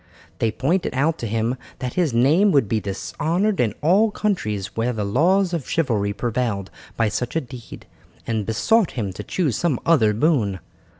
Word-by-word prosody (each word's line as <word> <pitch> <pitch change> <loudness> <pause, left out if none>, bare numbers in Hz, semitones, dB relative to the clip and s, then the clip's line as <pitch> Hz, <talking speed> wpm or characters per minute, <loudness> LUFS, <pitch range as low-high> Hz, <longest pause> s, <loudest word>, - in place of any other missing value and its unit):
They 115 - +1
pointed 145 - -1
out 155 +5 +1
to 115 - -3
him 115 +3 -1 0.2
that 125 -1 -4
his 175 -6 +1
name 150 - +4
would 140 -7 +3
be 110 +2 0
dishonoured 165 - -1
in 110 -4 +1
all 195 +8 +4
countries 105 - -2
where 115 +2 0
the 105 -3 -2
laws 175 - +2
of 160 -7 -3
chivalry 110 -11 0
prevailed 110 -2 -2 0.3
by 115 - +2
such 120 +5 -3
a 165 - +2
deed, 125 -2 -11 0.4
and 110 -2 -1
besought 215 - +2
him 100 -5 -2
to - - -7
choose 155 - -1
some 160 -8 0
other 110 -11 +4
boon. 115 - +1
125 Hz, 175 wpm, -22 LUFS, 110-165 Hz, 0.4 s, name